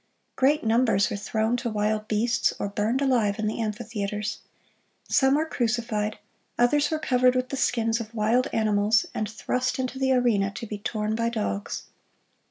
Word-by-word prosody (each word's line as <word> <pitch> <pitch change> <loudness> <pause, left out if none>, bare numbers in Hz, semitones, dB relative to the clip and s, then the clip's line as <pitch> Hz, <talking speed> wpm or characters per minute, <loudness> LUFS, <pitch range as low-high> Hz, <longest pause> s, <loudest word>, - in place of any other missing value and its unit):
Great 290 +3 +3
numbers 225 -4 +2
were - - -1
thrown 220 +3 -1
to 240 -1 -2
wild 215 0 -1
beasts 230 +2 +1
or - - -2
burned 215 +7 0
alive 230 -7 +2
in 215 - -2
the 215 +2 -2
amphitheaters. 210 -1 -3 0.7
Some 265 0 +3
were 310 +2 +1
crucified; 230 -6 -1 0.4
others 290 +5 +3
were 315 - 0
covered 255 -3 +2
with 255 0 0
the - - -3
skins 230 -3 +1
of 230 0 -8
wild 230 +4 +2
animals, 215 0 +2
and 215 -1 -2
thrust 250 +3 -2
into 260 0 -3
the 265 0 +2
arena 230 -6 +2
to 235 - -5
be 210 -1 -6
torn 215 +1 -2
by 230 +1 0
dogs. 155 - -3
225 Hz, 170 wpm, -26 LUFS, 210-250 Hz, 0.7 s, Great